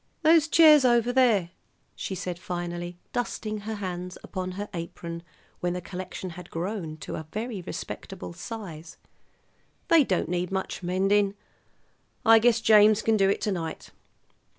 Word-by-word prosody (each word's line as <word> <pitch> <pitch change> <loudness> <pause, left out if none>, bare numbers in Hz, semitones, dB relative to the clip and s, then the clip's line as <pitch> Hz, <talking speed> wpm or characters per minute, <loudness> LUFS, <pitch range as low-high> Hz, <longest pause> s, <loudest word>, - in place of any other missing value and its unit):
"Those 320 0 +5
chairs 310 -3 +7
over 240 -1 +3
there," 225 -9 +3 0.4
she 190 - -4
said 180 -1 -5
finally, 175 -1 -5 0.2
dusting 220 -3 -3
her 220 +2 -5
hands 180 -2 -5
upon 185 -1 -5
her 205 +2 -5
apron 170 0 -6 0.4
when 175 0 -1
the 180 - -3
collection 185 0 -6
had 175 0 -10
grown 170 -2 -4
to - - -5
a 155 - -7
very 220 -2 -4
respectable 180 0 -7
size, 175 -4 -8 0.9
"they 330 -3 +7
don't 185 -10 0
need 180 +1 -2
much 190 0 -3
mending; 195 +3 +2 0.9
I 225 0 +8
guess 235 0 +3
James 215 -1 +6
can 225 - +3
do 195 -2 +3
it 200 - 0
to 210 - 0
night. 165 -4 -5
190 Hz, 150 wpm, -27 LUFS, 175-220 Hz, 0.9 s, I